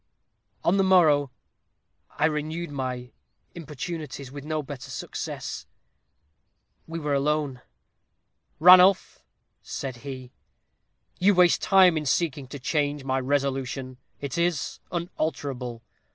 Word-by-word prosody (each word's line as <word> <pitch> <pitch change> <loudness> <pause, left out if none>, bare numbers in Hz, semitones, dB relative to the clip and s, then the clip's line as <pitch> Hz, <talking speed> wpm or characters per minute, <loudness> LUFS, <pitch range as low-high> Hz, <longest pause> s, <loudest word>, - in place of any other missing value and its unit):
"On 180 +4 +3
the 195 - +4
morrow 155 -7 +4 0.8
I - - 0
renewed 155 +1 -2
my 130 -2 -4 0.4
importunities, 150 -3 -6
with 140 0 -8
no 155 0 -2
better 140 -2 -8
success. - - -6 1.2
We 165 +1 -5
were 150 -3 -2
alone. 140 -2 0 1.0
"'Ranulph,' 180 +3 +6 0.4
said 130 -3 -6
he, 130 -1 -8 0.9
'you 200 +2 +4
waste 180 -1 +5
time 185 -4 +5
in 150 -2 -3
seeking 145 -2 0
to 140 - -8
change 145 +1 -1
my 130 0 0
resolution. 135 -1 -2 0.2
It 140 +3 -4
is 170 -4 -1
unalterable. 140 -8 -4
145 Hz, 110 wpm, -26 LUFS, 135-165 Hz, 1.2 s, Ranulph